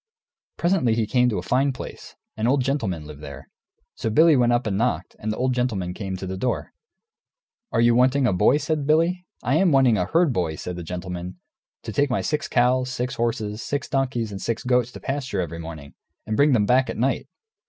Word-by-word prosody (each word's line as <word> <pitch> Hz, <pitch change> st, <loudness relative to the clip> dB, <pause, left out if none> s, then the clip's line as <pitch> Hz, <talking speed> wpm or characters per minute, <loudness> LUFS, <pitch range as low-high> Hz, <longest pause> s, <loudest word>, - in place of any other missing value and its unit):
Presently 170 Hz, -10 st, +2 dB
he 115 Hz, -1 st, +1 dB
came 125 Hz, +2 st, +2 dB
to 110 Hz, -, -1 dB
a 90 Hz, -, -3 dB
fine 130 Hz, +7 st, +2 dB
place; 125 Hz, -, -9 dB, 0.2 s
an 110 Hz, +1 st, -1 dB
old 135 Hz, +1 st, +2 dB
gentleman 110 Hz, -, -2 dB
lived 75 Hz, -1 st, -10 dB
there. 70 Hz, -3 st, -9 dB, 0.5 s
So 115 Hz, -, -3 dB
Billy 155 Hz, +7 st, +5 dB
went 120 Hz, -2 st, +3 dB
up 120 Hz, 0 st, +1 dB
and 105 Hz, -3 st, -1 dB
knocked, 120 Hz, +5 st, -1 dB
and 110 Hz, -, -2 dB
the 105 Hz, -, -4 dB
old 130 Hz, 0 st, +1 dB
gentleman 110 Hz, -8 st, -1 dB
came 95 Hz, -1 st, -5 dB
to 95 Hz, -, -6 dB
the 95 Hz, 0 st, -4 dB
door. 125 Hz, +6 st, -2 dB, 1.0 s
"Are 115 Hz, -, +2 dB
you 120 Hz, 0 st, +5 dB
wanting 130 Hz, +3 st, +3 dB
a 120 Hz, -, +2 dB
boy?" 105 Hz, +9 st, +4 dB
says 155 Hz, 0 st, -1 dB
Billy. 165 Hz, +5 st, +1 dB, 0.2 s
"I -, -, +2 dB
am 190 Hz, -3 st, +3 dB
wanting 130 Hz, -5 st, +4 dB
a 90 Hz, -, +1 dB
herd 165 Hz, -, +2 dB
boy," 85 Hz, -5 st, -1 dB
says 90 Hz, +3 st, -6 dB
the 90 Hz, -, -6 dB
gentleman, 90 Hz, +1 st, -6 dB, 0.4 s
"to -, -, -6 dB
take 145 Hz, 0 st, +2 dB
my 125 Hz, -, 0 dB
six 150 Hz, -, -2 dB
cows, 125 Hz, +1 st, +2 dB
six 125 Hz, 0 st, -3 dB
horses, 115 Hz, -2 st, -2 dB
six 145 Hz, -1 st, -3 dB
donkeys, 125 Hz, -5 st, -1 dB
and 95 Hz, -, -6 dB
six 115 Hz, -1 st, -2 dB
goats 125 Hz, -1 st, +1 dB
to -, -, -8 dB
pasture 135 Hz, -7 st, -3 dB
every 85 Hz, -2 st, -3 dB
morning, 80 Hz, -3 st, -9 dB, 0.3 s
and 110 Hz, -, -2 dB
bring 145 Hz, +4 st, +4 dB
them 105 Hz, -4 st, +3 dB
back 130 Hz, +4 st, +3 dB
at -, -, -4 dB
night. 130 Hz, +4 st, 0 dB
120 Hz, 215 wpm, -24 LUFS, 95-135 Hz, 1.0 s, Billy